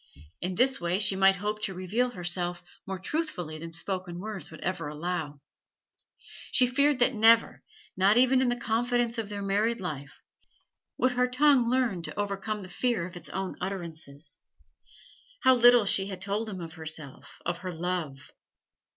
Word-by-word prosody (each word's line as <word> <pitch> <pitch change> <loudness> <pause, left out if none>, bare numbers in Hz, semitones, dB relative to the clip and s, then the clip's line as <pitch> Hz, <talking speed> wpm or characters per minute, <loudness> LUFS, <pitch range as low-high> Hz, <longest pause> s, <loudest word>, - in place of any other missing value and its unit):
In 180 +1 -2
this 260 +2 +2
way 175 +1 +1
she 200 -1 +3
might 195 0 +5
hope 210 +2 -3
to 195 -3 -2
reveal 210 +8 0
herself 175 -3 -3 0.2
more 190 0 -3
truthfully 185 - -3
than 165 +1 -7
spoken 185 0 -5
words 195 -4 -6
would - - -11
ever 180 -4 -2
allow; 150 -1 -4 1.1
she 250 - +5
feared 280 +3 +2
that 250 +1 +3
never, 225 +1 +4 0.3
not 195 +4 +4
even 255 +1 +5
in 255 - +2
the 245 - +1
confidence 240 0 0
of 215 -2 -4
their 205 -1 -5
married 210 +4 +1
life, 145 -7 -6 0.8
would 255 - +2
her 250 0 +2
tongue 255 -1 +4
learn 245 -8 +1
to 170 - -6
overcome 205 +1 -2
the - - -8
fear 230 0 -1
of 180 0 -9
its 175 - -7
own 190 0 -4
utterances. 160 -6 -6 1.0
How 260 - +7
little 245 -2 +6
she 195 0 +1
had 190 -2 -6
told 205 +4 -2
him 190 -3 -6
of 165 -1 -7
herself, 155 -4 -8
of 175 +1 -2
her 185 -1 -5
love! 165 -5 -4
195 Hz, 170 wpm, -28 LUFS, 175-235 Hz, 1.1 s, How